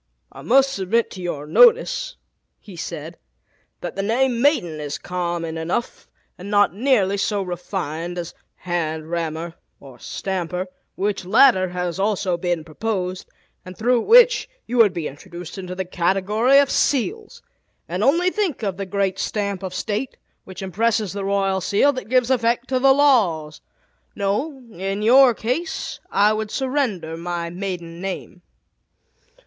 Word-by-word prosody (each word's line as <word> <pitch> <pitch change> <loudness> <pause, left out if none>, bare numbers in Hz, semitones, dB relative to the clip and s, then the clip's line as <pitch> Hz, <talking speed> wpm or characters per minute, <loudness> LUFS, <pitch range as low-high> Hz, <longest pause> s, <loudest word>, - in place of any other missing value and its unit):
"I - - -11
must 270 +2 +3
submit 205 +5 0
to 185 - -8
your 155 -5 -4
notice," - - +4 0.4
he 195 - -13
said, 165 -1 -7 0.6
"that - - -5
the 195 - -1
name 235 +3 +1
'maiden' 180 - +2
is 145 -1 -4
common 170 -2 -3
enough, 175 +9 -3 0.3
and 190 +3 -8
not 205 -3 +3
nearly 205 -4 +2
so 200 0 0
refined 175 -2 -4
as 175 -1 -5 0.2
'hand 160 -3 -3
rammer,' 165 0 -3 0.3
or 130 -3 -14
'stamper,' 185 -1 -3 0.3
which 200 0 -1
latter 210 -1 +5
has 180 0 -3
also 195 -3 0
been 175 -2 -2
proposed, 185 +2 -4 0.3
and 185 0 -11
through 240 +1 +2
which - - +5 0.2
you 245 - -3
would 225 -4 +6
be 170 -4 -4
introduced 175 +5 -9
into 185 -1 -6
the 190 0 -3
category 195 +8 +2
of 280 -1 +4
seals; 395 - -1 0.4
and 180 +4 -2
only 340 +8 +3
think 365 - -2
of 195 -3 -2
the 195 -1 -4
great 195 -1 -1
stamp 200 -3 -2
of 190 -1 -5
state, 215 +8 -3 0.3
which 190 +1 -8
impresses 215 +1 0
the 200 -1 -4
royal 195 -1 0
seal 215 +10 +3
that 255 -4 -7
gives 255 0 +2
effect 235 0 +1
to 260 -1 +1
the 270 +1 +5
laws! 210 - +2 0.5
No, 255 +8 -2
in 195 +2 -3
your 250 +1 +6
case 325 - -3
I 205 +2 +3
would 215 0 -3
surrender 255 - -2
my 170 0 -4
maiden 175 -2 -6
name." 190 -1 -6
195 Hz, 150 wpm, -22 LUFS, 175-240 Hz, 0.6 s, would